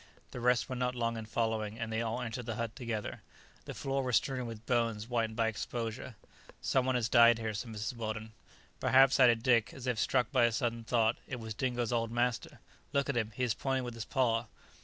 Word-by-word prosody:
The - - -6
rest 125 0 +2
were 130 - -4
not 125 0 -1
long 115 -1 -1
in 110 -1 -6
following, 110 -2 -1
and 115 -1 -4
they 110 - 0
all 115 +2 -2
entered 120 0 -5
the 115 - -2
hut 115 -2 -3
together. 115 -4 -4 0.4
The - - -7
floor 135 0 -1
was 125 -3 0
strewn 130 -1 0
with 115 -1 -8
bones 115 -4 +1
whitened 115 -2 -1
by 115 0 +2
exposure. 115 +2 -4 0.4
"Some 130 -1 +1
one 130 - +2
has 120 -2 +1
died 120 -1 +6
here," 110 -1 -3
said 110 +4 -5
Mrs. 110 +3 -4
Weldon. 110 -1 -4 0.5
"Perhaps," 135 +1 +5
added 120 -3 +5
Dick, 120 -4 +3
as 130 - -8
if 125 -3 0
struck 125 0 +1
by 125 -4 +4
a 120 - +2
sudden 115 -1 -1
thought, 115 0 +2
"it 125 - -5
was 110 -1 -5
Dingo's 120 0 -1
old 115 -1 0
master. 120 0 -1 0.3
Look 140 0 +1
at 140 - 0
him! 110 -2 0
he 130 - -2
is 120 -3 +2
pointing 135 0 -1
with 120 -1 -5
his 115 -1 -6
paw." 120 -4 +1
115 Hz, 225 wpm, -32 LUFS, 115-125 Hz, 0.5 s, died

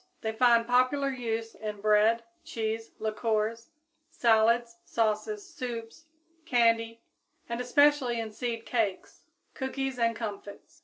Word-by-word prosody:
They 220 - -1
find 235 0 +4
popular 255 +3 +2
use 230 -3 -3
in 210 -1 -6
bread, 215 +2 +3 0.2
cheese, 225 -7 -3
liquors, 220 +1 -1 0.4
salads, 230 +1 +2
sauces, 230 - -1
soups, 250 -3 -7 0.4
candy, 230 -4 +2 0.4
and 235 +1 -3
especially 265 -2 +3
in 225 -1 -4
seed 230 +1 -4
cakes, 220 -6 -2 0.3
cookies 265 -1 -3
and 230 0 +2
comfits. 210 +7 -8
230 Hz, 110 wpm, -29 LUFS, 220-250 Hz, 0.4 s, find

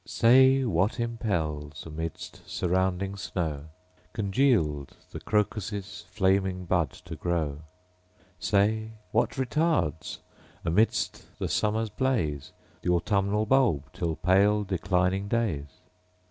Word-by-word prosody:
Say, 130 +3 +5
what 100 +3 +1
impels, 80 -11 -2
amidst 80 +1 -6
surrounding 95 +2 0
snow, 80 -6 -3 0.5
Congealed, 100 - +1
the - - -6
crocus' 105 -1 -2
flamy 95 -1 +2
bud 90 -2 0 0.2
to - - -6
grow? 80 -5 -1 0.8
Say, 110 +2 +1 0.2
what 120 +5 +1
retards, 130 - 0 0.5
amidst 95 +7 +1
the - - -2
summer's 110 +1 0
blaze, 80 - -1 0.3
Th' - - -6
autumnal 100 +4 +1
bulb 120 - +2
till 80 -2 -2
pale, 100 +4 +3
declining 95 0 0
days 100 -11 -1
95 Hz, 100 wpm, -27 LUFS, 85-110 Hz, 0.8 s, Say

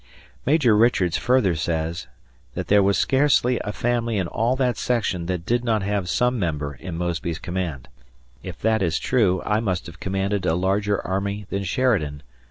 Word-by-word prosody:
Major 135 -7 +4
Richards 105 -7 +3
further 125 -8 +2
says 80 +1 -2 0.5
"that - - -4
there 105 0 +6
was 100 0 +2
scarcely 130 -3 +3
a 105 - -3
family 115 0 -1
in 95 - 0
all 115 +8 0
that 125 -2 +1
section 105 -8 -1
that 90 -2 -3
did 120 +3 +1
not 110 -4 +1
have 100 -2 -1
some 125 +4 +1
member 75 -6 -2
in 80 +4 -7
Mosby's 85 -1 -2
command." 85 -6 -4 0.5
If 90 -2 -8
that 110 -1 +2
is 85 -4 +1
true, 105 -8 +1
I 105 +1 +1
must 95 -6 -2
have 85 - -11
commanded 95 +1 -1
a 80 - +2
larger 100 +3 +1
army 100 +2 -2
than 100 0 -1
Sheridan. 90 - 0
100 Hz, 175 wpm, -23 LUFS, 85-115 Hz, 0.5 s, there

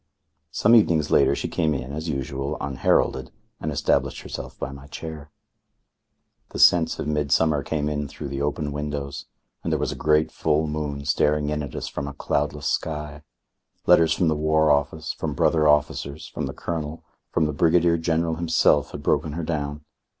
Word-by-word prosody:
Some 105 +9 +3
evenings 85 -10 +4
later - - +4
she - - -3
came 80 -3 0
in, 65 0 -5
as 80 +3 -4
usual, 70 -1 -3
unheralded, 65 -1 +1 0.3
and 80 - -3
established 75 - 0
herself - - -7
by 70 - -4
my 70 0 -11
chair. 75 -1 -8 1.2
The - - -7
scents 85 -2 +5
of - - -4
midsummer 75 0 +2
came 75 +1 -2
in 75 -1 -2
through 70 +1 -7
the 70 +1 -4
open 75 +1 -1
windows, 75 -1 -4 0.4
and - - -2
there - - +2
was - - -1
a - - -5
great 75 +1 +2
full 80 0 +1
moon 75 -2 -4
staring 75 +1 +1
in 75 0 -1
at 70 -4 -7
us - - -4
from 70 - -4
a 70 - -6
cloudless 75 +1 -2
sky. 75 -2 -2 0.6
Letters 85 -2 +5
from 85 0 +1
the 80 - +2
War 80 0 +3
Office, 75 +2 0
from 75 -3 -4
brother 75 +3 +3
officers, 75 0 +1
from - - -4
the - - -6
Colonel, 80 -2 -4 0.3
from 80 - +1
the 75 - -1
Brigadier 85 +2 +3
General 80 0 0
himself, 80 -4 +2
had - - -7
broken 75 - +1
her 85 +2 -4
down. 75 -2 -3
75 Hz, 180 wpm, -24 LUFS, 70-80 Hz, 1.2 s, scents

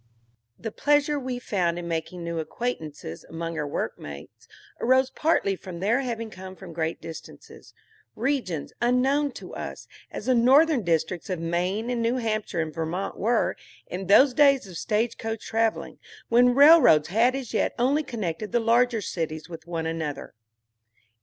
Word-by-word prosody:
THE 225 - -5
pleasure 290 +3 +2
we 255 -2 -4
found 180 -8 -1
in 175 -1 -5
making 170 +1 -4
new 170 -1 -3
acquaintances 155 - -5
among 165 0 -5
our 150 - -2
workmates 75 - -6 0.3
arose 260 +2 +3
partly 300 -11 +1
from 180 -2 -9
their 215 +7 +2
having 230 -3 -4
come 185 0 -9
from 185 -3 -11
great 160 0 -2
distances, 160 -1 -11 0.4
regions 235 - -2
unknown 265 +4 +2
to - - -10
us, - - -7 0.2
as - - -7
the 255 - +3
northern 265 +4 +5
districts 170 0 -1
of 180 -3 -2
Maine 180 +8 -1
and 240 -1 -1
New 230 +2 +1
Hampshire 215 -7 -1
and 155 -1 -4
Vermont 165 +4 -3
were, 230 +2 +1 0.3
in 185 +1 -6
those 255 +7 +6
days 275 -3 +4
of 185 -3 -11
stage 225 +1 -1
coach 225 -1 -4
traveling, 225 0 -1 0.3
when 245 +1 +5
rail 310 +4 +8
roads 155 - +5
had 235 +7 +3
as 265 -4 -5
yet - - 0
only 270 +5 +2
connected 210 - -4
the 240 - +2
larger 230 0 +2
cities 160 -3 -4
with 165 -1 -10
one 165 -2 -3
another. 160 -3 -4
215 Hz, 160 wpm, -25 LUFS, 170-250 Hz, 0.4 s, rail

